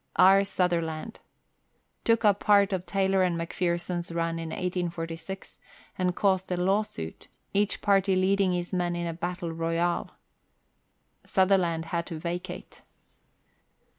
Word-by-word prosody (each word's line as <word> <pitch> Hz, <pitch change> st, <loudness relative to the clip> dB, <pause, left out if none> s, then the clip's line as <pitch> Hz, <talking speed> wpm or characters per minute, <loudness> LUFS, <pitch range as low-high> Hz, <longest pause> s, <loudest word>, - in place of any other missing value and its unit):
R. 195 Hz, +1 st, +7 dB
Sutherland. 175 Hz, 0 st, -1 dB, 0.9 s
Took 230 Hz, -1 st, +3 dB
up 205 Hz, -1 st, +4 dB
part 200 Hz, -2 st, +4 dB
of 185 Hz, -1 st, -3 dB
Taylor 195 Hz, -1 st, +2 dB
and 175 Hz, -2 st, +1 dB
McPherson's 170 Hz, 0 st, -2 dB
run 165 Hz, 0 st, -1 dB
iii 165 Hz, -, -4 dB
184G, 175 Hz, +1 st, -4 dB, 0.4 s
and 180 Hz, -1 st, 0 dB
caused 190 Hz, -2 st, +1 dB
a 180 Hz, -, 0 dB
law 190 Hz, +4 st, +3 dB
suit, 80 Hz, -, -8 dB, 0.3 s
each 205 Hz, +1 st, 0 dB
party 195 Hz, -1 st, +3 dB
leading 190 Hz, 0 st, +2 dB
his 175 Hz, +1 st, -3 dB
men 175 Hz, -1 st, 0 dB
in 175 Hz, 0 st, -2 dB
a 165 Hz, -, -2 dB
battle 175 Hz, 0 st, -4 dB
royal. 165 Hz, +1 st, -1 dB, 1.1 s
Sutherland 185 Hz, -4 st, +2 dB
had 170 Hz, +1 st, -2 dB
to 165 Hz, -, -5 dB
vacate. 175 Hz, +3 st, -6 dB
180 Hz, 130 wpm, -28 LUFS, 170-195 Hz, 1.1 s, R